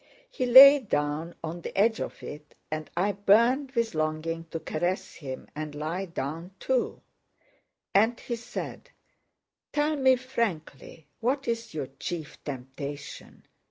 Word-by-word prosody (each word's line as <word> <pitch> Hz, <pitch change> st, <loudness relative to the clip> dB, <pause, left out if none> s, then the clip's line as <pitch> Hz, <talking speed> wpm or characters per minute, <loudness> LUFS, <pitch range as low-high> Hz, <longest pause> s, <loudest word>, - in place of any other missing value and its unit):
He 255 Hz, -, -1 dB
lay 275 Hz, +4 st, +11 dB
down 160 Hz, -, -2 dB
on 165 Hz, +2 st, -5 dB
the -, -, -7 dB
edge 220 Hz, +3 st, +3 dB
of -, -, -6 dB
it 150 Hz, 0 st, -9 dB, 0.2 s
and 155 Hz, 0 st, -4 dB
I 195 Hz, +4 st, +2 dB
burned 235 Hz, +8 st, +3 dB
with 230 Hz, -4 st, 0 dB
longing 155 Hz, +1 st, -2 dB
to 165 Hz, 0 st, -5 dB
caress 175 Hz, +4 st, -2 dB
him 130 Hz, -4 st, -7 dB
and 150 Hz, -1 st, -5 dB
lie 160 Hz, +6 st, -3 dB
down 165 Hz, 0 st, -5 dB
too. 260 Hz, -2 st, -1 dB, 0.9 s
And 225 Hz, +5 st, +3 dB
he 240 Hz, -, -4 dB
said, 240 Hz, +1 st, -7 dB, 0.8 s
"Tell 300 Hz, +1 st, +1 dB
me 260 Hz, -1 st, +5 dB
frankly 205 Hz, -, -4 dB
what 270 Hz, +4 st, 0 dB
is 230 Hz, -6 st, -3 dB
your 150 Hz, -, -2 dB
chief 165 Hz, -4 st, -6 dB
temptation? 140 Hz, +1 st, -7 dB
175 Hz, 135 wpm, -28 LUFS, 155-240 Hz, 0.9 s, lay